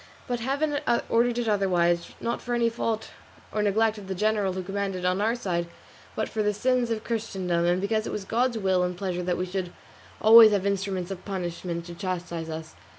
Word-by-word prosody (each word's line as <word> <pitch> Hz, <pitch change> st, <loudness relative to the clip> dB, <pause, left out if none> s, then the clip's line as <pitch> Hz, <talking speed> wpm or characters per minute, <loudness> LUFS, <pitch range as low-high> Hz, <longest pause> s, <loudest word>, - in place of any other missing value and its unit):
But 245 Hz, -1 st, -2 dB
Heaven 285 Hz, +4 st, 0 dB, 0.3 s
ordered 235 Hz, +1 st, +2 dB
it 240 Hz, -1 st, -1 dB
otherwise, 175 Hz, -4 st, +1 dB
not 235 Hz, +1 st, -2 dB
for 245 Hz, -1 st, -2 dB
any 235 Hz, -1 st, +2 dB
fault 225 Hz, -1 st, -3 dB, 0.4 s
or 215 Hz, -, 0 dB
neglect 215 Hz, +1 st, +2 dB
of 195 Hz, -, -11 dB
the 190 Hz, -, -3 dB
general 210 Hz, -1 st, +1 dB
who 185 Hz, 0 st, -4 dB
commanded 195 Hz, -1 st, -3 dB
on 185 Hz, +2 st, +1 dB
our 225 Hz, +3 st, +2 dB
side, 175 Hz, -7 st, -2 dB, 0.5 s
but -, -, -1 dB
for 220 Hz, -, -2 dB
the 210 Hz, -1 st, +1 dB
sins 250 Hz, +2 st, +1 dB
of 225 Hz, -1 st, -2 dB
Christendom, 190 Hz, -7 st, -1 dB
and 175 Hz, +1 st, +2 dB
because 215 Hz, +3 st, 0 dB
it -, -, -4 dB
was 200 Hz, -, -4 dB
God's 240 Hz, +3 st, +1 dB
will 190 Hz, -3 st, +2 dB
and 180 Hz, 0 st, -1 dB
pleasure 180 Hz, -2 st, -2 dB
that 180 Hz, 0 st, -1 dB
we 185 Hz, -, -1 dB
should 185 Hz, -1 st, -4 dB, 0.5 s
always 220 Hz, 0 st, +9 dB
have 200 Hz, -1 st, +1 dB
instruments 195 Hz, -2 st, -1 dB
of 190 Hz, -1 st, -6 dB
punishment 175 Hz, -3 st, -4 dB
to 175 Hz, -, -8 dB
chastise 170 Hz, -3 st, -4 dB
us. 160 Hz, 0 st, -6 dB
195 Hz, 205 wpm, -26 LUFS, 180-225 Hz, 0.5 s, always